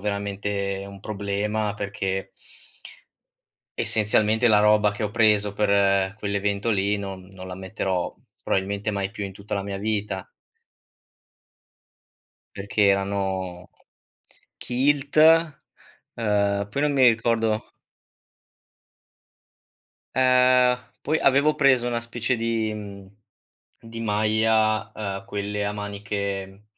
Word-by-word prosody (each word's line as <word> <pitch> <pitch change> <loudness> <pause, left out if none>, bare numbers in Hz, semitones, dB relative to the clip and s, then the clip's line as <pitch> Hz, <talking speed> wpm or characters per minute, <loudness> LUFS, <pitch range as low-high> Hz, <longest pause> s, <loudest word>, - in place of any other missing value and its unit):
veramente 100 -1 -3
un 100 0 -11
problema 105 +1 -2
perché 95 -2 -3 1.5
essenzialmente 110 +2 +2
la 105 - +5
roba 105 0 +4
che 105 - -6
ho 105 - -2
preso 105 -2 +3
per 100 -2 +2
quell'evento 100 +1 -1
lì 100 0 +1
non 95 -2 -6
non 95 -1 -10
la 90 - -6
metterò 95 -1 -3 0.3
probabilmente 100 +2 -1
mai 100 -1 -2
più 105 -2 -6
in 100 - -6
tutta 100 +2 -6
la 100 - -2
mia 100 -1 -5
vita. 105 -2 -3 2.3
Perché 100 +1 +1
erano 95 -2 -1 0.9
kilt, 140 +4 0 1.0
ehm, 100 -2 0
poi 140 +7 -2
non 150 -1 +1
mi 135 -2 +5
ricordo 115 -1 +1 2.4
Ehm, 125 -1 +4 0.3
poi 155 +3 0
avevo 140 +3 +4
preso 130 -4 +3
una 120 -1 -1
specie 120 +1 -2
di 115 -1 -1
mhmm, 100 -2 -10 0.6
di 115 0 -9
maglia, 110 0 +1
ehm, 100 -2 -5
quelle 105 0 -3
a 100 - -1
maniche, 100 -1 -4
mhmm, 95 +2 -18
105 Hz, 110 wpm, -24 LUFS, 100-110 Hz, 2.4 s, la